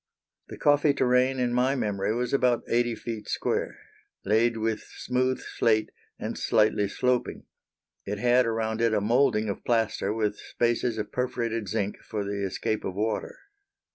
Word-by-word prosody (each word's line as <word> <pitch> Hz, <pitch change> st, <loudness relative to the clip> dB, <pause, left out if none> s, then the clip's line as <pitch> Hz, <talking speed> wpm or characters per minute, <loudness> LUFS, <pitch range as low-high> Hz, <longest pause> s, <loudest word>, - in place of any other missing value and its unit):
The -, -, -9 dB
coffee 145 Hz, 0 st, +3 dB
terrane 130 Hz, +1 st, +3 dB
in 125 Hz, -1 st, 0 dB
my 125 Hz, +3 st, +2 dB
memory 105 Hz, -5 st, -1 dB
was 125 Hz, +1 st, -2 dB
about 125 Hz, -3 st, +2 dB
eighty 120 Hz, 0 st, +1 dB
feet 110 Hz, -2 st, -6 dB
square, -, -, -1 dB, 0.5 s
laid 115 Hz, +3 st, +2 dB
with 110 Hz, 0 st, -1 dB, 0.2 s
smooth 130 Hz, +1 st, 0 dB
slate, 110 Hz, -2 st, 0 dB, 0.3 s
and -, -, -5 dB
slightly 105 Hz, -1 st, +2 dB
sloping. 125 Hz, +4 st, -1 dB, 0.6 s
It 105 Hz, +1 st, -4 dB
had 125 Hz, +2 st, +3 dB
around 110 Hz, 0 st, -1 dB
it 115 Hz, -2 st, +3 dB
a -, -, +3 dB
moulding 110 Hz, 0 st, +2 dB
of 100 Hz, -, -4 dB
plaster 115 Hz, -4 st, 0 dB
with 105 Hz, -1 st, -1 dB
spaces 120 Hz, -1 st, -1 dB
of 105 Hz, -1 st, -4 dB
perforated 115 Hz, -3 st, -2 dB
zinc 100 Hz, +3 st, -2 dB
for 105 Hz, -2 st, -4 dB
the 100 Hz, 0 st, -3 dB
escape 100 Hz, +3 st, -2 dB
of 95 Hz, -, -4 dB
water. 110 Hz, +1 st, -2 dB
115 Hz, 155 wpm, -27 LUFS, 105-125 Hz, 0.6 s, coffee